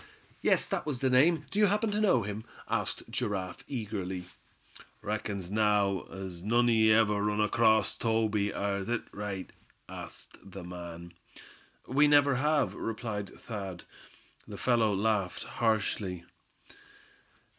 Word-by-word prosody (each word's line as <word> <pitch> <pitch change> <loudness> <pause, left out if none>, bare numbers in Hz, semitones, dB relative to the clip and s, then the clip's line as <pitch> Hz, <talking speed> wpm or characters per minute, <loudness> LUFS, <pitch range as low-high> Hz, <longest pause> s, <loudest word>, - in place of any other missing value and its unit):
"Yes, - - +3
that - - -2
was 140 -5 -2
the 130 -1 +2
name; 150 +4 +4
do 205 - -1
you 210 - +6
happen 210 +2 +1
to 210 +1 0
know 130 - +4
him?" 105 +2 -5 0.2
asked - - -1
Giraffe, 100 -6 -2
eagerly. 100 -7 -4 0.8
"Reckons 100 -3 -3
now, 105 -3 +2
as 95 -3 -8
none 120 +5 +3
o' - - +4
ye 110 -1 +5
ever 105 -2 +4
run 105 0 0
acrost 110 0 +3
Toby; 110 -3 +1
air 100 -1 -1
thet 115 +2 -1
right?" 100 -2 -5 0.4
asked - - -9
the 95 -2 -9
man. 85 -1 -8 0.7
"We 145 +4 +4
never 145 -2 +5
have," 150 +1 +2
replied 110 -3 -4
Thad. 100 -6 -6 0.6
The - - -8
fellow 115 -4 +2
laughed 100 -2 0
harshly. 100 -5 -1
110 Hz, 135 wpm, -30 LUFS, 100-120 Hz, 0.8 s, you